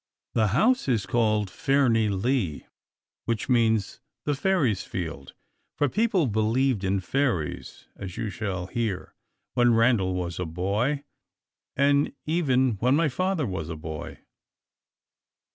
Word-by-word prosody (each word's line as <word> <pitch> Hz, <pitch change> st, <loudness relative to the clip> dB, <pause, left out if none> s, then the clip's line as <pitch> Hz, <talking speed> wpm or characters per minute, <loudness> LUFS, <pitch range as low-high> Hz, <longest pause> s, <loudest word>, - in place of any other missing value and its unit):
The 110 Hz, -2 st, +3 dB
house 225 Hz, -, +2 dB
is 115 Hz, -7 st, +1 dB
called 105 Hz, -1 st, +1 dB
Fairnilee, 115 Hz, -, +1 dB, 0.6 s
which 115 Hz, +2 st, -2 dB
means 115 Hz, -4 st, +2 dB, 0.3 s
"the 145 Hz, -, +1 dB
Fairies' 145 Hz, -, +1 dB
Field;" 80 Hz, -7 st, -6 dB, 0.4 s
for 145 Hz, -, +3 dB
people 210 Hz, -, +2 dB
believed 110 Hz, +1 st, +1 dB
in 95 Hz, +1 st, +1 dB
fairies, 95 Hz, -, -2 dB
as 95 Hz, -3 st, -8 dB
you 110 Hz, -2 st, -3 dB
shall 95 Hz, -3 st, -3 dB
hear, 105 Hz, -1 st, -3 dB, 0.4 s
when 120 Hz, -1 st, +4 dB
Randal 115 Hz, -6 st, +3 dB
was 85 Hz, -2 st, -3 dB
a 90 Hz, -, -1 dB
boy, 105 Hz, -, -1 dB, 0.7 s
and 140 Hz, +1 st, +3 dB
even 130 Hz, -, +2 dB
when 125 Hz, +5 st, +3 dB
my 160 Hz, 0 st, +2 dB
father 185 Hz, +2 st, 0 dB
was 85 Hz, -6 st, -4 dB
a 80 Hz, -, -4 dB
boy. 80 Hz, 0 st, -7 dB
115 Hz, 125 wpm, -26 LUFS, 95-135 Hz, 0.7 s, when